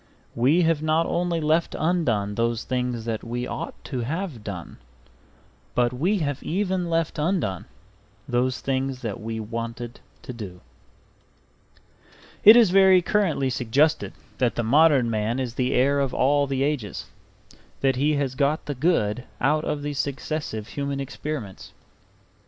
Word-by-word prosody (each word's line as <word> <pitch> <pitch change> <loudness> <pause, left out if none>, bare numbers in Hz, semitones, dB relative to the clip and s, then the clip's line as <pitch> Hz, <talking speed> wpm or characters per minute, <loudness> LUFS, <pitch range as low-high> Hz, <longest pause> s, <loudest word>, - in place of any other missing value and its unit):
We 140 +9 +3
have 165 -2 +2
not 155 +1 +2
only 175 -1 0
left 160 +2 +1
undone 125 - 0
those 115 +1 -1
things 125 -2 -2
that 115 -2 -3
we 120 +1 -3
ought - - -5
to 130 - -4
have 145 - -4
done, 90 -5 -7 1.0
but 120 0 +2
we 175 +12 +1
have 145 -5 -2
even 185 -1 -1
left 165 -2 -1
undone 150 - -1 0.6
those 125 +1 0
things 135 -1 -2
that 105 -4 -4
we 110 +1 -4
wanted 115 +2 -5 0.2
to 125 - -7
do 95 -6 -8 1.8
It 215 +2 +11
is 230 -6 +6
very 190 -1 +6
currently 165 -10 +1
suggested 140 +6 +1 0.3
that 125 -2 +1
the 120 - -1
modern 140 +1 +4
man 110 +2 -1
is 125 -3 -3
the 125 +1 0
heir 140 +3 +3
of 135 -2 -1
all 145 +2 +3
the 135 0 0
ages, 140 -8 -2 0.8
that 135 -1 +2
he 145 +4 +2
has 140 -3 -1
got 140 +3 0
the 145 - -3
good 125 -6 0
out 150 +4 +2
of 145 -1 -2
these 145 -1 -3
successive 140 -6 -3
human 140 -1 -3
experiments. 135 -6 -6
135 Hz, 145 wpm, -24 LUFS, 120-155 Hz, 1.8 s, It